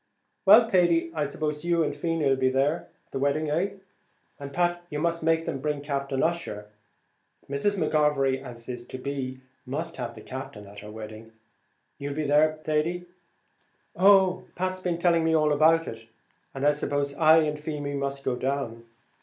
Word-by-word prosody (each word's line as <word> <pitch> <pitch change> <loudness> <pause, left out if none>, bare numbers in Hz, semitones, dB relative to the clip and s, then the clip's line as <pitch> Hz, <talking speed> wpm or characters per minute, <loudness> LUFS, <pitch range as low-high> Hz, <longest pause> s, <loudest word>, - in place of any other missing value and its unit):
"Well, 225 +4 +8
Thady, 175 -5 +3
I 150 -2 0
suppose 150 +1 -3
you 170 -1 +2
and 150 - -2
Feemy 165 0 -1
'll 135 - +4
be 130 0 +1
at 145 +5 +1 0.2
the - - -3
wedding, 145 +2 0
eh? 185 +6 0 0.7
and, 140 -1 -7
Pat, 175 +2 0
you 150 - -4
must 170 +2 0
make 165 0 +2
them 135 - -3
bring 150 +1 -2
Captain 140 -2 -2
Ussher. 160 -11 -2 0.8
Mrs. 140 +9 0
McGovery, 150 -5 +2
as 120 -3 -9
is 120 -1 -5
to - - -7
be, 130 -1 -4 0.2
must 155 +5 -4
have 120 -2 -5
the - - -10
Captain 130 -5 -8
at 100 +1 -11
her 105 - -10
wedding; 110 +1 -9 0.7
you'll 140 0 -4
be 155 0 -1
there, 155 +2 +3
Thady?" 165 +4 -1 0.9
"Oh, 190 -1 +5
Pat's 185 +1 -2
been 180 -2 -1
telling 170 -1 +3
me 160 0 +2
about 155 +1 +4
it, 115 0 -8 0.5
and 135 +1 -2
I 145 - +6
suppose 145 -1 -2
I 160 0 +6
and 150 0 -2
Feemy 150 -2 -4
must 140 0 -3
go 125 - +1
down. 125 -3 -3
150 Hz, 170 wpm, -26 LUFS, 135-165 Hz, 0.9 s, Well